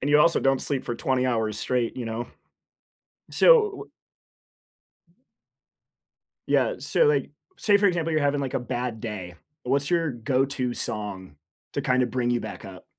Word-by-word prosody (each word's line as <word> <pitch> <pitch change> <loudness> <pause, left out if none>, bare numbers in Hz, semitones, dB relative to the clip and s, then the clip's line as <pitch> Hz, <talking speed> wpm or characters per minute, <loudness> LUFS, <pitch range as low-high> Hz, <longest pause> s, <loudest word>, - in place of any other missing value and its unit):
And 145 - -1
you 150 - +6
also 170 +3 +4
don't 135 0 +2
sleep 140 -3 -1
for 120 - -3
20 130 +1 0
hours 110 -4 -1
straight, 125 -2 -1
you 125 - -4
know? 115 +1 -4 1.0
So, - - +2
w 435 -5 +4 2.6
Yeah, - - +2
so, - - +2
like, 450 -1 +2 0.3
say, 205 - +3
for 200 0 +4
example, 165 -3 0
you're 155 - +2
having, 145 0 +1
like, 135 -2 -3
a - - 0
bad 120 -2 -4
day. 95 -6 -6 0.3
What's 140 +2 0
your 165 -4 +1
go-to 130 +1 -1
song 100 -9 -5 0.4
to 140 - -1
kind 130 -1 +2
of 125 - 0
bring 120 0 -1
you 120 0 +1
back - - -8
up? 95 -2 -11
130 Hz, 165 wpm, -25 LUFS, 115-145 Hz, 2.6 s, you